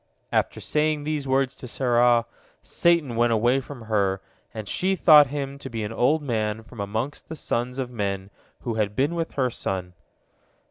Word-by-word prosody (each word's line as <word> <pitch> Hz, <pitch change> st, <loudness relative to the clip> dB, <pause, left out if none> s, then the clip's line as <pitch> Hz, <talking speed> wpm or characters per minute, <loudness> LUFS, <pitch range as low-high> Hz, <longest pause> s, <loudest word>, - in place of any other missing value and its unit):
After -, -, 0 dB
saying 150 Hz, -1 st, 0 dB
these 150 Hz, -2 st, -2 dB
words 135 Hz, 0 st, +2 dB
to 125 Hz, -, -8 dB
Sarah, 120 Hz, -1 st, +3 dB, 0.4 s
Satan 170 Hz, -8 st, +2 dB
went 120 Hz, +1 st, +3 dB
away 120 Hz, +4 st, +3 dB
from 130 Hz, -3 st, -10 dB
her, 100 Hz, -3 st, +1 dB, 0.3 s
and 110 Hz, -2 st, -7 dB
she 190 Hz, -, 0 dB
thought 150 Hz, -5 st, +7 dB
him 140 Hz, 0 st, -4 dB
to 135 Hz, -, -7 dB
be 115 Hz, -3 st, -4 dB
an 105 Hz, +2 st, -4 dB
old 145 Hz, +7 st, +2 dB
man 110 Hz, -4 st, -1 dB
from 115 Hz, 0 st, -14 dB
amongst 110 Hz, +8 st, -4 dB
the 160 Hz, -, -5 dB
sons 125 Hz, -3 st, -2 dB
of 130 Hz, -2 st, -3 dB
men 100 Hz, -3 st, -3 dB, 0.3 s
who 120 Hz, -, -3 dB
had 105 Hz, -2 st, -1 dB
been 140 Hz, +7 st, +1 dB
with 165 Hz, -1 st, -3 dB
her 130 Hz, -3 st, 0 dB
son. 90 Hz, -5 st, -4 dB
125 Hz, 180 wpm, -25 LUFS, 110-145 Hz, 0.4 s, thought